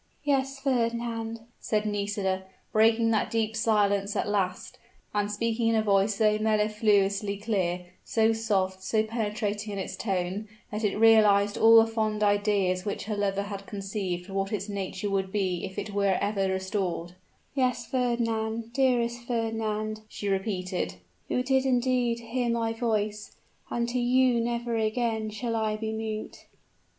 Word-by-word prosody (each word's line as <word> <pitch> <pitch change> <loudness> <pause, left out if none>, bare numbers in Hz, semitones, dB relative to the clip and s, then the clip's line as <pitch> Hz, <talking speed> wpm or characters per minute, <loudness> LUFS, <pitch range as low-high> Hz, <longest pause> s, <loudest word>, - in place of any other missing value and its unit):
"Yes, 275 -1 +1
Fernand," 230 -3 -1 0.2
said 215 -1 -1
Nisida, 200 -2 -1 0.3
breaking 225 +1 +4
that 220 - +1
deep 220 -1 -1
silence 205 -2 +2
at - - 0
last, 195 -3 -2 0.3
and 205 0 0
speaking 230 +2 0
in 230 - +3
a 220 - +2
voice 200 0 +3
so 215 0 +3
mellifluously 210 -2 +2
clear, 185 -4 -1 0.2
so 225 0 +2
soft, 195 -4 0
so 215 +3 +1
penetrating 210 -1 -2
in - - -4
its 190 -1 -4
tone, 190 +1 -2 0.2
that 210 +1 -3
it 205 -1 +1
realized 210 -2 +5
all 225 0 +7
the 225 0 +8
fond 215 -2 -1
ideas 205 -3 +2
which 205 - -3
her 215 0 -3
lover 200 -1 0
had 200 -1 -7
conceived 195 -3 -4
of 195 - -8
what 195 0 -1
its 210 -1 -2
nature 200 -1 -3
would 195 -1 -1
be 190 -4 -1
if 190 0 -9
it 210 - -4
were 200 -2 +2
ever 200 -1 0
restored, 190 -2 -2 0.4
"yes, 255 -3 0
Fernand, 230 -2 -1
dearest 245 -2 +1
Fernand," 220 -2 -2
she 205 - -5
repeated, 185 - -1 0.3
"you 250 - 0
did 265 0 +2
indeed 250 -2 +1
hear 240 +1 -2
my 230 -1 0
voice, 215 -3 -2 0.4
and 235 0 -1
to 250 +1 -1
you 245 0 +3
never 235 0 -2
again 220 0 0
shall 230 +2 -3
I 220 -1 0
be 220 0 -3
mute." 220 -1 -5
215 Hz, 155 wpm, -27 LUFS, 200-230 Hz, 0.4 s, the